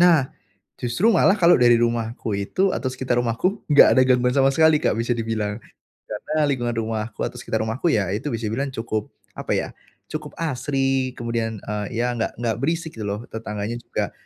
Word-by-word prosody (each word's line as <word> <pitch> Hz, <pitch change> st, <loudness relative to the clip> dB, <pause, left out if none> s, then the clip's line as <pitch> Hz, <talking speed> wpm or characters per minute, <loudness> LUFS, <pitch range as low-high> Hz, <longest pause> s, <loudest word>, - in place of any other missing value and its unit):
Nah, 165 Hz, -7 st, +5 dB, 0.5 s
justru 125 Hz, -, +1 dB
malah 195 Hz, 0 st, +4 dB
kalau 175 Hz, 0 st, +6 dB
dari 120 Hz, -1 st, +6 dB
rumahku 115 Hz, -1 st, -1 dB
itu, 185 Hz, -, 0 dB
atau 130 Hz, -, -2 dB
sekitar 130 Hz, -1 st, -2 dB
rumahku, 120 Hz, -, -1 dB
enggak 145 Hz, -, +8 dB
ada 130 Hz, -, +7 dB
gangguan 125 Hz, 0 st, +3 dB
sama 135 Hz, -1 st, +4 dB
sekali, 160 Hz, 0 st, +5 dB
Kak, -, -, +1 dB
bisa 115 Hz, +1 st, 0 dB
dibilang. 110 Hz, -2 st, -2 dB, 0.5 s
Karena 150 Hz, +8 st, -1 dB
lingkungan 120 Hz, -4 st, -1 dB
rumahku 110 Hz, -1 st, -3 dB
atau -, -, -7 dB
sekitar 110 Hz, -, -2 dB
rumahku, 115 Hz, +10 st, -1 dB
ya 100 Hz, -4 st, +1 dB
itu 110 Hz, +8 st, -2 dB
bisa 115 Hz, -1 st, -3 dB
dibilang 135 Hz, +6 st, -2 dB
cukup, 110 Hz, -3 st, -4 dB, 0.2 s
apa -, -, -3 dB
ya, -, -, -1 dB, 0.4 s
cukup 155 Hz, -1 st, -5 dB
asri. 135 Hz, -3 st, 0 dB
Kemudian, 115 Hz, -2 st, -3 dB
eee, 105 Hz, +3 st, -4 dB
ya, 125 Hz, 0 st, 0 dB
enggak 115 Hz, -, -1 dB
enggak 115 Hz, -2 st, 0 dB
berisik 160 Hz, +2 st, -1 dB
gitu 110 Hz, -, -5 dB
loh. 100 Hz, +1 st, -2 dB
Tetangganya 105 Hz, 0 st, -4 dB
juga, -, -, -3 dB
120 Hz, 180 wpm, -23 LUFS, 110-140 Hz, 0.5 s, enggak